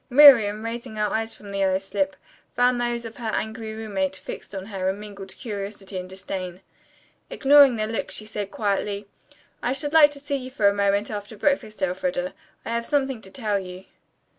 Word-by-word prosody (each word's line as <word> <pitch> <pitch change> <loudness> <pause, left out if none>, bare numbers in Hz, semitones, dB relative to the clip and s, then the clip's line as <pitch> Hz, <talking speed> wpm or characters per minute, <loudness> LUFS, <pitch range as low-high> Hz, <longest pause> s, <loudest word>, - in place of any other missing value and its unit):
Miriam, 235 -6 +8
raising 235 0 -5
her 210 -1 0
eyes 225 0 -1
from 205 -1 -11
the 200 - -3
yellow 190 -1 +3
slip, 195 0 -1 0.4
found 245 0 +3
those 240 -1 -1
of 225 - -8
her 235 - -5
angry 220 0 -3
roommate 195 -4 -2
fixed 190 +2 -8
on 190 -1 -5
her 190 -3 -2
in 195 +2 -3
mingled 200 -2 -9
curiosity 200 -3 -6
and 180 0 -7
disdain. 185 -1 -6 0.7
Ignoring 280 -2 +6
the 215 -1 -1
look 225 +1 -3
she 215 - -4
said 210 -2 -4
quietly, 200 0 -1 0.6
"I 245 - 0
should 290 +2 -3
like 310 -2 +8
to 285 - -10
see 285 0 -2
you 255 -1 -7
for 220 -6 +2
a 200 - +5
moment 200 +1 +1
after 210 +1 -6
breakfast, 215 -5 0
Elfreda. 180 0 -1 0.3
I - - -5
have 235 0 0
something 270 -5 0
to 190 - -12
tell 210 -2 -1
you." 185 0 -9
210 Hz, 190 wpm, -25 LUFS, 195-240 Hz, 0.7 s, Miriam